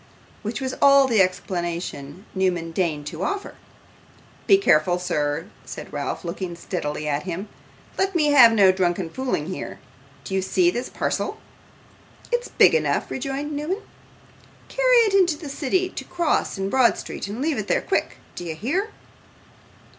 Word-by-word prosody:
which 215 0 -4
was 260 -1 -3
all 275 -1 +7
the 225 -5 +4
explanation 175 -3 -3
Newman 180 -3 0
deigned 160 -4 -1
to 160 +2 -6
offer. 400 - -3 0.9
'Be 390 - +7
careful, 175 - +3
sir,' 150 -3 -1 0.2
said - - -9
Ralph, - - -4
looking 175 +1 -4
steadily 155 -3 -4
at 145 0 0
him. 185 +3 -5 0.5
'Let 385 -1 +1
me 300 -3 +3
have 250 -5 +8
no 200 -4 +6
drunken 180 -2 -1
fooling 255 - -2
here. 185 +2 -6 0.5
Do - - -7
you 190 - +1
see 350 - +2
this 245 -6 -4
parcel?' - - -2 0.9
'It's 485 0 0
big - - +5
enough,' 475 - 0
rejoined 275 +3 -3
Newman. 305 +8 -3 0.9
'Carry - - +3
it 415 - 0
into 355 -6 +4
the 300 -2 -8
city; 330 +7 0
to - - -7
Cross, 345 - 0
in 195 0 -2
Broad 260 -3 +4
Street, - - -6
and 205 +4 -6
leave 290 -3 0
it 205 - -4
there - - +1
quick. - - -1 0.2
Do - - -7
you 165 -2 -5
hear? 325 - -1
205 Hz, 160 wpm, -23 LUFS, -, 0.9 s, have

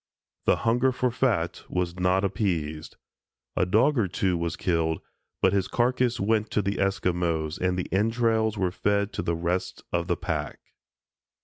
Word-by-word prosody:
The - - +5
hunger 120 +3 +3
for 125 0 0
fat 110 -9 0
was 90 0 -2
not 90 +2 +2
appeased; 85 -6 -2 0.6
a 90 - +2
dog 120 +8 +3
or 105 - +2
two 90 +1 0
was 85 0 -2
killed, 80 -2 0 0.4
but 95 - +5
his 95 -1 +1
carcass 125 0 +1
went 110 +2 +1
to 105 - 0
the 100 +1 -1
Esquimos 85 -5 0
and 90 0 0
the 90 - -1
entrails 110 +1 +2
were 95 -3 +1
fed 100 +2 0
to - - -2
the 85 - -1
rest 85 +2 -2
of 85 0 0
the 85 - 0
pack. - - -3
95 Hz, 165 wpm, -26 LUFS, 85-110 Hz, 0.6 s, The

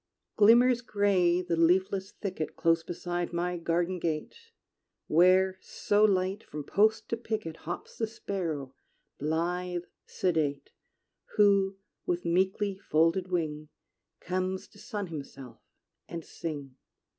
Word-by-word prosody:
Glimmers 235 +3 +6
gray 190 -6 +2
the 175 -1 -1
leafless 190 +3 +2
thicket 185 -6 -5
Close 165 0 +3
beside 175 +1 -3
my 175 +1 -1
garden 175 +2 0
gate, 155 -2 -2 0.7
Where, 185 +3 +4
so 205 +1 +1
light, 195 0 +2
from 150 0 -7
post 215 +8 +2
to 230 - -1
picket 215 -8 -4
Hops 175 +3 -7
the 225 - +1
sparrow, 165 - -4 0.5
blithe, 175 +3 -1 0.2
sedate; 150 -6 -1 0.6
Who, 200 -2 +4 0.3
with 175 0 -1
meekly 190 +3 +1
folded 165 +1 +2
wing, 155 -4 -2 0.5
Comes 185 +1 -2
to 205 - -18
sun 205 -1 -4
himself 140 -6 -9 0.5
and 165 -2 -6
sing. 145 -5 -6
180 Hz, 115 wpm, -29 LUFS, 165-195 Hz, 0.7 s, Glimmers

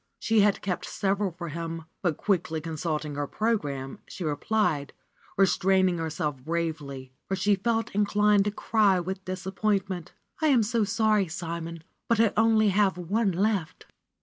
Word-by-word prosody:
She 225 -1 +2
had 205 -1 +3
kept 180 -3 -2
several 200 0 0
for 170 0 -7
him, 165 +1 -5 0.2
but 175 -5 0
quickly 165 -5 0
con 160 +1 -6
sulting 155 -1 -2
her 145 0 -1
program, 145 -13 -2
she 185 - -7
replied, 150 -1 0 0.4
restraining 190 -1 +3
herself 155 -3 -2
bravely, 150 -5 -3 0.2
for 195 - -1
she 205 +2 +2
felt 225 +3 0
inclined 205 0 +3
to 210 - 0
cry 205 -3 +2
with 190 +2 -4
disappointment: 190 -1 -2 0.3
am 275 -7 +4
so 225 +1 +1
sorry, 210 -1 +2
Simon, 165 -1 -5 0.2
but 230 -1 +2
I 225 -3 +4
only 220 -1 +4
have 195 -1 +2
one 195 +4 0
left." 190 -2 -1
190 Hz, 150 wpm, -27 LUFS, 165-210 Hz, 0.4 s, am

